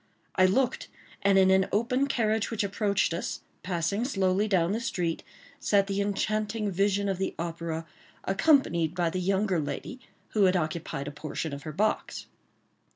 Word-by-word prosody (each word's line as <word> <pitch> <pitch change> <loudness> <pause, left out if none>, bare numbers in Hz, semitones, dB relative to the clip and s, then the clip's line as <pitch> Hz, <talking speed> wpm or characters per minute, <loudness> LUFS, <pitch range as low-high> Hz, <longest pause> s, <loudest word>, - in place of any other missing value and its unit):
I 185 -1 +5
looked; 255 +6 +1 0.3
and 200 -1 +4
in 190 0 +6
an 190 0 +4
open 250 +6 +1
carriage 220 -5 +1
which 225 -2 -1
approached 200 -2 +1
us, 170 - -3 0.2
passing 180 +4 -1
slowly 195 -4 +1
down 185 -4 +2
the 220 - 0
street, 175 -8 -2 0.4
sat 200 -1 +3
the 200 0 -1
enchanting 210 +1 -1
vision 200 +2 +1
of 190 -2 -1
the 190 - -2
opera, 165 -1 -4 0.4
accompanied 190 - +2
by 175 -2 +1
the 185 - -2
younger 190 0 +1
lady 155 - -5 0.3
who 210 -3 +3
had 185 0 +3
occupied 155 -4 -3
a - - -4
portion 155 +1 -5
of 140 - -6
her - - -4
box. 210 +7 -1
195 Hz, 160 wpm, -28 LUFS, 170-210 Hz, 0.4 s, in